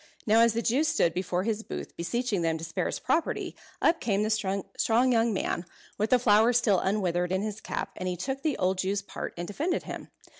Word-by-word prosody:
Now 220 +2 +5
as 230 -1 +5
the 230 - 0
Jew 260 +7 +2
stood 170 - +2
before 180 0 -1
his 220 0 -1
booth - - -7
beseeching 210 +3 -1
them 165 -1 +1
to 160 - -9
spare 165 0 -2
his - - -2
property, 330 - -1 0.3
up 330 0 +4
came 205 -3 +1
the 215 - 0
strong 215 +4 +1
young 230 -1 +3
man, 190 -3 -1 0.4
with 215 +1 +1
the 255 - +6
flower 225 0 +4
still 230 -6 +3
unwithered 180 -3 0
in 190 +1 0
his 215 0 -4
cap, - - -4
and 185 0 -2
he 180 - -3
took 265 +9 -3
the 305 -3 0
old 185 0 +1
Jew's 195 +1 0
part - - -6
and 175 0 -4
defended 305 - -1
him. - - -7
210 Hz, 220 wpm, -28 LUFS, 185-235 Hz, 0.4 s, the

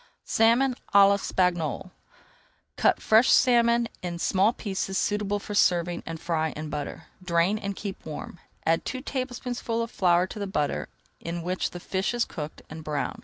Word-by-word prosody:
SALMON 235 +4 +3 0.2
À 200 -1 +9
L'ESPAGNOLE 180 -4 0 0.8
Cut - - +3
fresh 220 +3 +4
salmon 235 -1 +4
in 175 -1 -4
small 195 +5 +3
pieces 195 -4 -3
suitable 205 0 0
for 205 +1 -7
serving, 175 -3 +2
and 165 -1 -5
fry 160 -2 -1
in 155 0 -6
butter. 145 -1 -5 0.2
Drain 175 +4 +2
and 200 -2 -4
keep 195 -1 -6
warm. 160 +2 -7 0.3
Add 165 0 +2
two 255 - -4
tablespoonfuls 250 -3 -3
of 230 - -6
flour 180 -1 +3
to 200 - -8
the 200 - -3
butter, 150 -7 -1 0.3
in 170 0 -5
which 180 +2 -1
the 175 - -8
fish 190 +6 -2
is 240 - +1
cooked, 150 -1 -7
and 160 +1 -9
brown. 150 -1 -3
190 Hz, 165 wpm, -26 LUFS, 170-225 Hz, 0.8 s, À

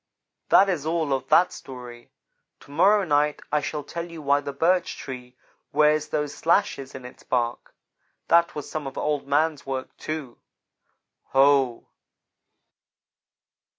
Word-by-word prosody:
"That 195 - +6
is 175 -7 -1
all 160 -2 0
of 130 -1 -2
that 180 - +4
story. 125 -2 -10 0.5
To - - -16
morrow 205 +7 +4
night 150 -3 +1
I 150 0 +2
shall 150 +1 -4
tell 170 +4 -6
you 165 -1 -9
why 145 -1 +2
the 140 - -5
birch 175 +5 +1
tree 125 -1 -9 0.3
wears 150 0 +3
those 150 -1 -2
slashes 165 -6 0
in 130 -1 -9
its 125 - -12
bark. 120 -2 -2 0.5
That 170 0 +4
was 150 - -5
some 155 -3 -5
of 135 - -8
Old 150 -2 -1
man's 150 +1 +1
work, 130 -1 -4
too. 155 -6 -6 0.9
Ho!" 135 -3 +3
145 Hz, 140 wpm, -25 LUFS, 135-160 Hz, 0.9 s, That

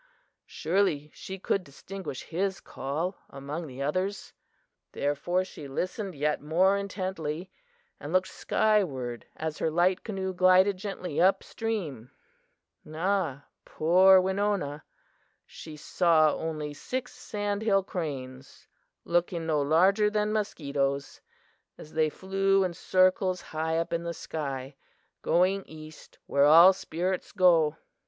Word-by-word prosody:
Surely 160 -4 0
she 190 - -8
could 195 0 -1
distinguish 175 +1 -8
his 190 +3 -2
call 155 +8 -4
among 145 +4 -6
the 135 0 -6
others! 185 +7 -2 0.6
Therefore 160 +6 0
she 150 -6 -10
listened 185 +6 -4
yet 150 +1 0
more 180 +6 +3
intently, 185 -4 -4 0.5
and 145 - -7
looked 185 +1 +2
skyward 140 - 0
as 155 -1 -4
her - - +1
light 175 +3 +2
canoe 190 -3 -3
glided 185 +2 +4
gently 185 -5 -3
up 190 +1 +4
stream. 165 - -4 0.8
"Ah, 165 -4 -1 0.2
poor 185 +4 +5
Winona! 190 -6 -1 0.6
She 155 -2 -11
saw 155 -1 +3
only 155 -2 -4
six 250 - -5
sandhill 205 -1 -1
cranes, 135 -8 -6 0.4
looking 170 -1 0
no 155 -2 +1
larger 190 +8 +4
than 210 0 0
mosquitoes, 140 -9 -2 0.6
as 155 - -12
they 155 -1 +2
flew 195 +3 +1
in 180 -2 -2
circles 185 +1 +2
high 160 0 -2
up 165 +1 -2
in 170 - 0
the 170 0 -4
sky, 135 -3 -5 0.5
going 185 +3 +2
east 155 0 -13
where 140 0 +3
all 165 +5 +8
spirits 180 +1 -3
go. 170 -5 +4
175 Hz, 120 wpm, -28 LUFS, 150-190 Hz, 0.8 s, all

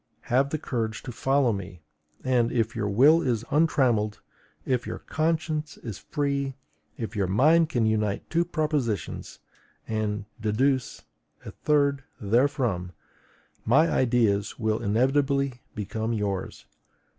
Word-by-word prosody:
Have 135 +3 +1
the 155 - -1
courage 115 -7 -3
to 125 - -6
follow 135 0 +2
me; 90 -4 -7 0.4
and, 125 -3 +2
if 115 0 0
your 105 -2 -1
will 145 +11 +5
is 120 -6 -1
untrammelled, 130 -9 +2 0.5
if 125 -1 0
your - - -4
conscience 155 -1 -2
is 110 -5 -7
free, 140 -2 -2 0.4
if 115 0 -5
your 100 -3 0
mind 155 - +4
can 120 -7 +1
unite 105 -2 0
two 170 0 +1
propositions 150 - -2 0.5
and 105 -2 -2 0.2
deduce 130 +5 0 0.4
a - - -6
third 140 -2 +1 0.2
therefrom, 115 -5 +1 0.7
my 145 +8 +4
ideas 115 -5 +1
will 110 -2 0
inevitably 135 +3 +1
become 110 +2 -3
yours. 100 -3 -3
120 Hz, 120 wpm, -26 LUFS, 110-140 Hz, 0.7 s, will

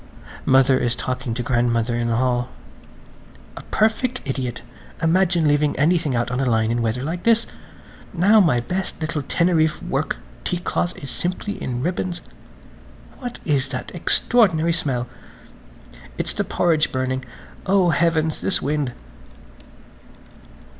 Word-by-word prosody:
Mother 130 0 +5
is 120 0 +1
talking 125 -2 -3
to 120 - -2
grandmother 120 -1 +1
in 120 0 -1
the 115 - +1
hall. 125 0 +1 1.1
"A - - -7
perfect 235 +3 0
idiot! 130 -3 -3 0.4
Imagine 170 0 +2
leaving 145 0 +2
anything 155 -3 +2
out 120 +1 -1
on 125 - -1
the 135 - +1
line 110 -1 +2
in 120 0 0
weather 115 +2 -1
like 170 +4 -3
this.... 230 0 +3 0.7
Now 195 +5 +5
my 160 -11 +4
best 180 +10 -4
little 155 -2 -2
Teneriffe 160 +1 +1
work - - -2 0.3
teacloth 175 0 -2
is 140 -3 -6
simply 185 - -3
in 125 -1 -3
ribbons. 175 +1 -2 1.0
What 245 -2 -6
is 140 -4 +1
that - - -6
extraordinary 175 -9 +2
smell? 130 -7 -1 1.1
It's - - -3
the - - -1
porridge 160 -3 +1
burning. 130 0 -1 0.4
Oh, 190 -3 +4
heavens–this 165 +2 +1
wind!" 145 -3 -1
150 Hz, 130 wpm, -22 LUFS, 125-175 Hz, 1.1 s, Mother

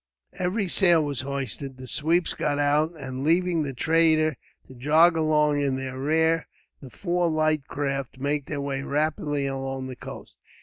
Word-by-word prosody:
Every 185 +3 -1
sail 175 -3 +4
was 140 -4 -2
hoisted, 135 0 -4
the 130 - -9
sweeps 165 +6 +1
got 145 -1 -1
out 150 +3 +1
and, 130 -1 -5
leaving 170 +1 +2
the 145 -2 -2
trader 160 +1 +3 0.3
to - - -13
jog 155 +7 +4
along 150 -2 +2
in 140 -2 0
their 130 0 -5
rear, 160 +3 +1 0.3
the 135 - -10
four 175 +3 -1
light 155 -2 +1
craft 135 -2 -3
made 140 +1 -2
their 145 -2 -3
way 140 -1 -3
rapidly 145 0 -1
along 135 -1 -4
the 130 -1 -7
coast. - - -10
145 Hz, 165 wpm, -25 LUFS, 135-160 Hz, 0.3 s, sail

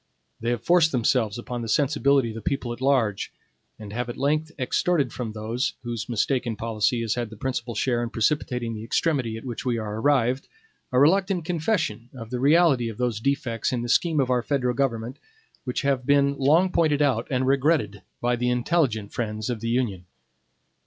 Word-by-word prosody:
They 115 - -2
have 120 -2 -1
forced 170 -2 +4
themselves 115 -3 +1
upon 120 0 -5
the 115 - -5
sensibility 140 -1 +2
of - - -6
the 115 - -7
people 120 +1 -2
at 120 - -11
large, 130 -7 +1 0.5
and 105 -2 -9
have 120 +1 -3
at 120 - -6
length 155 +3 0
extorted 140 +1 0
from 120 -3 -4
those, 110 +4 -2
whose 120 -1 -4
mistaken 120 0 0
policy 115 +1 0
has 115 -2 0
had 120 -2 -3
the 110 - -11
principal 120 -1 -3
share 120 +2 0
in 120 - -2
precipitating 120 -1 -1
the 110 0 -6
extremity 120 -2 0
at 115 - -10
which 120 -3 -5
we 125 -2 0
are 110 -1 -4
arrived, 130 -2 +2 0.4
a 125 - +1
reluctant 180 +3 +3
confession 160 - -1
of 115 -2 -9
the 125 - -2
reality 140 -4 +4
of 110 - -8
those 120 -4 -1
defects 120 -3 -1
in 120 -2 -2
the 120 - -4
scheme 160 +3 +2
of 130 -2 +1
our 125 -1 +2
federal 125 -1 0
government, 120 -1 -2 0.5
which 125 +1 -2
have 135 -2 +1
been 140 +1 +3
long 160 +7 +4
pointed 150 -4 +2
out 140 -3 +1
and 130 -1 0
regretted 135 - +1 0.2
by 120 0 +1
the 125 +1 0
intelligent 125 - 0
friends 110 0 -3
of 120 - -3
the 115 +1 -3
Union. 115 -7 -1
125 Hz, 195 wpm, -25 LUFS, 115-140 Hz, 0.5 s, forced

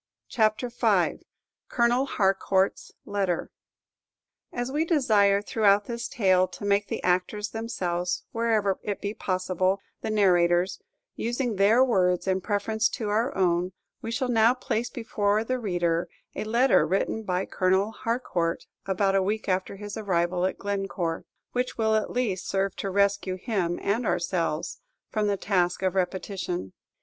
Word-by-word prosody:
CHAPTER 220 +2 +1
V. 240 - +1 0.4
COLONEL 245 +2 +2
HARCOUUT'S 195 -1 +1
LETTER 195 -4 -1 1.0
As 245 +2 -3
we 300 +3 +1
desire 215 - +3
throughout 205 -2 +3
this 235 0 -4
tale 185 -7 +3
to 185 - -8
make 200 0 +2
the - - -4
actors 185 +4 0
themselves, 180 -6 -2
wherever 220 -4 +1
it 205 -1 -3
be 205 +1 -3
possible, 185 -1 0 0.2
the - - -3
narrators, 180 -3 +3 0.3
using 240 0 -2
their 220 +6 +5
words 185 -7 +1
in 190 0 +1
preference 215 +2 0
to 215 -3 -4
our 225 +6 0
own, 180 0 +1 0.3
we 225 - -5
shall 255 +3 -1
now 235 0 +4
place 245 -1 -2
before 215 -2 0
the 255 +2 -2
reader 175 -5 0 0.2
a - - -4
letter 235 - +4
written 195 +5 0
by 185 -3 -1
Colonel 190 +3 +1
Harcourt 215 -8 -2 0.2
about 195 0 +1
a 195 - +3
week 210 +3 -2
after 185 +1 -1
his 205 +1 -7
arrival 180 -3 +1
at - - -5
Glencore, 195 -4 -3 0.3
which 250 0 -2
will 220 -1 +2
at 215 -1 +1
least 225 -7 -2
serve 195 0 0
to 195 - -3
rescue 200 -1 +1
him 185 -5 -1
and 220 +4 0
ourselves 170 -2 -1 0.3
from 215 -1 0
the 200 -1 +1
task 180 -2 0
of 185 - +1
repetition. 185 - -3
200 Hz, 145 wpm, -26 LUFS, 185-225 Hz, 1.0 s, their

